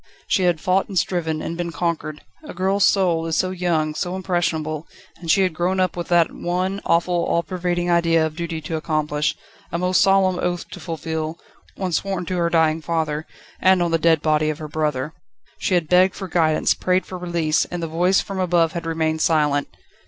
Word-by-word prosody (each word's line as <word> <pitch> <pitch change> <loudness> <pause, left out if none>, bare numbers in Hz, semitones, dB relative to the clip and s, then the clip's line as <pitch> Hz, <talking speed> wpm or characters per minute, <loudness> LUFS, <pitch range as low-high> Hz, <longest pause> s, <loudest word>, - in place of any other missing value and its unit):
She 185 - +1
had 175 -3 +2
fought 185 +4 +1
and 195 - -5
striven, 160 -3 -1
and 165 - -4
been 170 0 -3
conquered. 165 -3 -3 0.2
A 300 - -9
girl's 190 +2 +2
soul 170 -4 +2
is 165 - -1
so 185 - +1
young, 170 -4 0
so 175 +4 -3
impressionable; 165 -4 -2 0.3
and 170 - -9
she 195 +4 +5
had 185 -3 0
grown 180 +3 0
up 185 -2 +1
with 175 -1 -4
that 175 -2 +3
one, 185 +3 -2
awful, 170 +1 +2
all 170 - +1
pervading 175 -1 -2
idea 165 -2 +3
of 155 -1 -5
duty 170 -1 -4
to 160 +1 -3
accomplish, 150 -2 -1 0.4
a - - -1
most 180 +1 +2
solemn 190 -2 +3
oath 175 -1 -2
to - - -8
fulfil, 160 -1 -4 0.4
one 190 -2 -3
sworn 190 +1 -1
to 180 +1 -2
her 170 -1 +1
dying 160 -1 +2
father, 155 -1 -2 0.3
and 185 -1 +4
on 170 - -1
the 165 - +2
dead 160 -1 +3
body 155 0 +2
of 155 - -2
her 155 -1 -7
brother. 150 -1 -2 0.5
She 185 - +1
had 170 -3 +1
begged 180 +2 +4
for 190 - -6
guidance, 160 -3 +2
prayed 185 0 0
for 185 - -7
release, 170 -3 0
and 175 -1 -5
the - - -1
voice 175 +4 +2
from 195 -1 -6
above 170 -3 +2
had 170 -1 -5
remained 160 -1 -1
silent. 150 -3 +2
170 Hz, 205 wpm, -22 LUFS, 160-180 Hz, 0.5 s, she